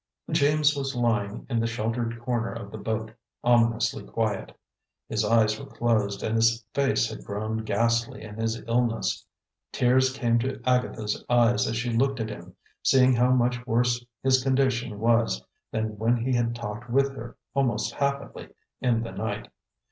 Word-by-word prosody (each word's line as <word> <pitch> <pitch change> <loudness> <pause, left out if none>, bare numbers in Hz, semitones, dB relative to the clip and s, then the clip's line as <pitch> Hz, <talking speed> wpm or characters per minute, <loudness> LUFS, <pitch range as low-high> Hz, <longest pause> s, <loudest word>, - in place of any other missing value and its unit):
James 150 -1 +3
was 135 -1 -3
lying 115 -3 0
in 120 -3 0
the 115 - +1
sheltered 115 0 -2
corner 120 -1 -1
of 115 0 -7
the - - -6
boat, 110 0 -3 0.3
ominously 115 -1 +2
quiet. 110 -3 -2 0.6
His 110 0 0
eyes 110 0 +3
were - - -8
closed, 105 -4 0
and 110 - -1
his 115 0 +2
face 135 -4 +2
had 110 - -8
grown 110 +2 -3
ghastly 115 +2 0
in 105 - -8
his 115 0 -2
illness. 115 -1 0 0.5
Tears 130 +1 +3
came 120 -3 +1
to 130 +2 -2
Agatha's 125 -4 0
eyes 120 0 +4
as 115 - -2
she 120 +2 -1
looked 135 +2 +1
at 110 -1 -2
him, 90 -3 -10 0.3
seeing 130 -1 +5
how 125 +1 +3
much 125 -1 +2
worse 120 +1 +1 0.2
his 130 -1 +4
condition 130 -4 +1
was 115 - +2 0.3
than 110 -1 -3
when 115 +2 +2
he 125 +3 -1
had 120 -1 0
talked 115 +1 -6
with 135 +2 +2
her, 120 -2 -9 0.2
almost 120 -6 0
happily, 140 0 -3 0.3
in 115 -2 +2
the 115 - -6
night. 105 +2 -4
115 Hz, 165 wpm, -26 LUFS, 110-125 Hz, 0.6 s, seeing